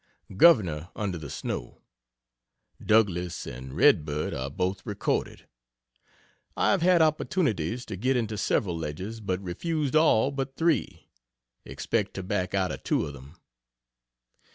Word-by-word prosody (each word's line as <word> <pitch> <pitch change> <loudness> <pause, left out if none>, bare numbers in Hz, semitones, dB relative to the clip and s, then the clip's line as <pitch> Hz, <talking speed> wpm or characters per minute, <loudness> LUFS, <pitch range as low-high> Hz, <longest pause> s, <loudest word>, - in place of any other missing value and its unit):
"Governor" 95 - +4
under 95 -5 -3
the 75 -3 -8
snow. - - -5 1.1
"Douglas" 90 -6 +1
and 65 +2 -8
"Red - - +5
Bird" 75 0 -3
are 65 +1 -3
both 90 +6 -2
recorded. 105 -4 -2 1.1
I - - +3
have 195 - +2
had 175 -1 +5
opportunities 125 - 0
to 110 - -6
get 125 +7 +1
into 110 -3 -2
several 95 -2 0
ledges, 90 +8 -5
but 95 -3 -2
refused 150 - -2
all 145 -5 +4
but 135 -1 -4
three 165 -1 0 0.6
expect 105 -4 -2
to 95 - -4
back 95 0 -2
out 95 -2 +1
of - - -6
two - - +1
of 70 - -7
them. 70 +4 -13
100 Hz, 135 wpm, -27 LUFS, 85-130 Hz, 1.1 s, Red